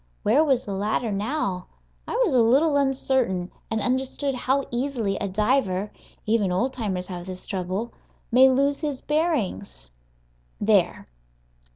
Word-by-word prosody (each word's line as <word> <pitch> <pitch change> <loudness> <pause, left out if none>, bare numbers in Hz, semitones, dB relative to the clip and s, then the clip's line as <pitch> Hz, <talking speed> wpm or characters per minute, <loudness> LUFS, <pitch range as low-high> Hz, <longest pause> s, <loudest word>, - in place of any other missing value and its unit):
Where 265 +9 +4
was 270 -5 +1
the 200 - -4
ladder 215 +3 -1
now? 200 -3 -2 0.4
I 465 - -2
was 345 - 0
a 250 - +5
little 280 +7 +4
uncertain, 265 -9 0 0.2
and 220 - -1
understood 260 +3 -1
how 265 +2 0
easily 240 -5 -1
a 200 - -2
diver 210 -1 0 0.3
(even 215 -4 +1
old 245 +9 0
timers 195 -7 -3
have 180 -1 -7
this 185 -1 -7
trouble) 190 +4 -3 0.4
may 260 +3 +7
lose 280 +2 +1
his 290 -4 -3
bearings. 195 - -2 0.7
There! - - +2
235 Hz, 140 wpm, -24 LUFS, 195-270 Hz, 0.7 s, may